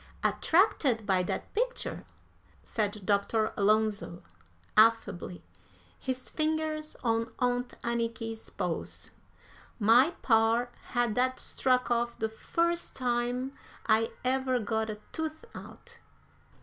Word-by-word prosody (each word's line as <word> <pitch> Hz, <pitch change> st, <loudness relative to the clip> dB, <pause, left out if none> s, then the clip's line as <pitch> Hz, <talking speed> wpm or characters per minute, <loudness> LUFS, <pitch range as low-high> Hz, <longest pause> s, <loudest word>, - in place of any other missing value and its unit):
"Attracted 285 Hz, -, +3 dB
by 190 Hz, -3 st, +3 dB
that 180 Hz, -, -4 dB
picture?" -, -, -2 dB, 0.6 s
said 210 Hz, -3 st, -2 dB
Dr. 215 Hz, +2 st, +1 dB
Alonzo, 205 Hz, -4 st, +1 dB, 0.5 s
affably, 215 Hz, -5 st, +3 dB, 0.6 s
his 260 Hz, -1 st, -3 dB
fingers 310 Hz, 0 st, -1 dB
on 230 Hz, -1 st, +1 dB
Aunt 245 Hz, 0 st, 0 dB
Anniky's 230 Hz, -1 st, -3 dB
pulse. -, -, -4 dB, 0.7 s
"My 245 Hz, +9 st, +5 dB
par 230 Hz, +1 st, +3 dB, 0.2 s
had 240 Hz, -3 st, +2 dB
that 255 Hz, +2 st, +1 dB
struck 255 Hz, -2 st, +1 dB
off 235 Hz, 0 st, 0 dB
the 220 Hz, -, -1 dB
first 340 Hz, +9 st, -1 dB
time 245 Hz, +1 st, -1 dB, 0.3 s
I 225 Hz, 0 st, +3 dB
ever 260 Hz, 0 st, +2 dB
got 220 Hz, -1 st, -1 dB
a 210 Hz, 0 st, -5 dB
tooth 315 Hz, +5 st, -4 dB
out. -, -, -11 dB
235 Hz, 105 wpm, -30 LUFS, 220-260 Hz, 0.7 s, My